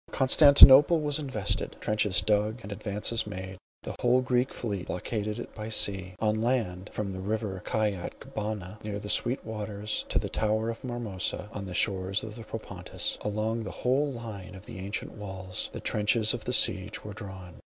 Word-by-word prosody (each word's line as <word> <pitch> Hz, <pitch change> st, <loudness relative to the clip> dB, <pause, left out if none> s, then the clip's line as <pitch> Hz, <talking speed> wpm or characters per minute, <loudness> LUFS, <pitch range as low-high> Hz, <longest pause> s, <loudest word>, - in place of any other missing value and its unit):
Constantinople 140 Hz, +3 st, +8 dB
was 150 Hz, -1 st, -1 dB
invested, 130 Hz, -9 st, -2 dB
trenches 105 Hz, -2 st, +1 dB
dug, 105 Hz, +1 st, +1 dB
and 100 Hz, -, -8 dB
advances 105 Hz, +3 st, -2 dB
made. 95 Hz, -1 st, -7 dB, 0.2 s
The -, -, -5 dB
whole 125 Hz, +1 st, +4 dB
Greek 125 Hz, 0 st, +1 dB
fleet 100 Hz, -6 st, -4 dB
blockaded 105 Hz, +3 st, -3 dB
it -, -, -8 dB
by 110 Hz, 0 st, -6 dB
sea; 95 Hz, -4 st, +4 dB
on 110 Hz, 0 st, +1 dB
land 110 Hz, -6 st, -1 dB
from 105 Hz, -2 st, -3 dB
the 95 Hz, -, -6 dB
river 100 Hz, -1 st, -3 dB
Kyat 105 Hz, -5 st, -2 dB
Kbanah, 105 Hz, -1 st, -6 dB
near 105 Hz, -1 st, -4 dB
the 105 Hz, 0 st, -4 dB
Sweet 125 Hz, +3 st, +1 dB
Waters, 105 Hz, -1 st, -3 dB
to -, -, -1 dB
the -, -, 0 dB
Tower 110 Hz, +1 st, 0 dB
of 115 Hz, -, -10 dB
Marmora, 115 Hz, -5 st, -3 dB
on 100 Hz, -1 st, -6 dB
the 90 Hz, -, -6 dB
shores 95 Hz, -1 st, +1 dB
of 110 Hz, -1 st, -7 dB
the 115 Hz, +1 st, -9 dB
Propontis, -, -, -4 dB
along 110 Hz, +2 st, -2 dB
the 105 Hz, -, -5 dB
whole 135 Hz, +7 st, 0 dB
line 110 Hz, -6 st, -8 dB
of 95 Hz, -, -11 dB
the -, -, -9 dB
ancient 100 Hz, +3 st, -5 dB
walls, 95 Hz, -3 st, -4 dB
the -, -, -7 dB
trenches 110 Hz, +1 st, +2 dB
of 120 Hz, -, -5 dB
the -, -, -1 dB
siege 100 Hz, -7 st, +2 dB
were 105 Hz, -, -6 dB
drawn. 95 Hz, -4 st, -9 dB
105 Hz, 180 wpm, -28 LUFS, 100-115 Hz, 0.2 s, Constantinople